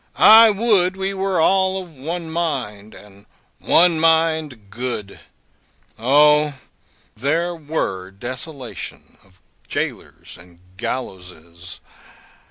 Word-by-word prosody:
I 225 +1 +8
would 200 -4 +1
we 195 +1 -2
were 190 -2 -1
all 190 +2 +2
of 180 -3 -10
one 165 +5 -5
mind, 125 -11 -4
and 100 0 -16 0.3
one 170 -1 +3
mind 160 -9 +1
good. 115 -3 -5 0.8
O, 150 +4 +4 0.6
there 165 +8 -1
were 145 - -4
desolation 130 +6 -8
of 95 -1 -26 0.3
gaolers - - -5
and 85 0 -18 0.2
gallowses! 90 -7 -7
150 Hz, 95 wpm, -20 LUFS, 105-175 Hz, 0.8 s, I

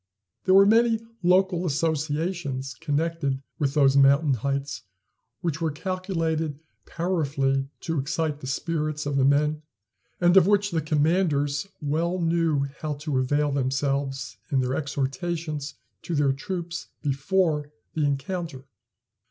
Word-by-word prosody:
There 185 0 +5
were 195 0 +8
many 225 +2 +4 0.2
local 180 0 +3
associations 150 -2 -1
connected 155 -2 -1 0.2
with 140 -1 0
those 135 -2 +5
mountain 140 +1 +5
heights 140 +3 -2 0.6
which 165 -3 -2
were 165 - +1
calculated 165 -3 -2 0.3
powerfully 140 -6 0
to 165 -2 -1
excite 150 +2 -1
the 130 - -7
spirits 155 +2 -2
of 145 -1 -1
the 135 - +3
men, 150 +2 +2 0.6
and 175 +1 +4
of 190 -2 +7
which 205 0 +3
the 165 -2 0
commanders 150 0 +1 0.2
well 165 +5 0
knew 165 -4 +1
how 155 -2 -3
to 145 -2 -2
avail 145 +3 +1
themselves 135 0 -1
in 140 -4 +2
their 130 0 0
exhortations 150 +1 -3 0.3
to 170 - -3
their 145 -2 +3
troops 175 +3 -5 0.2
before 150 +1 +1 0.2
the 155 - 0
encounter. 145 0 -2
150 Hz, 125 wpm, -26 LUFS, 140-170 Hz, 0.6 s, were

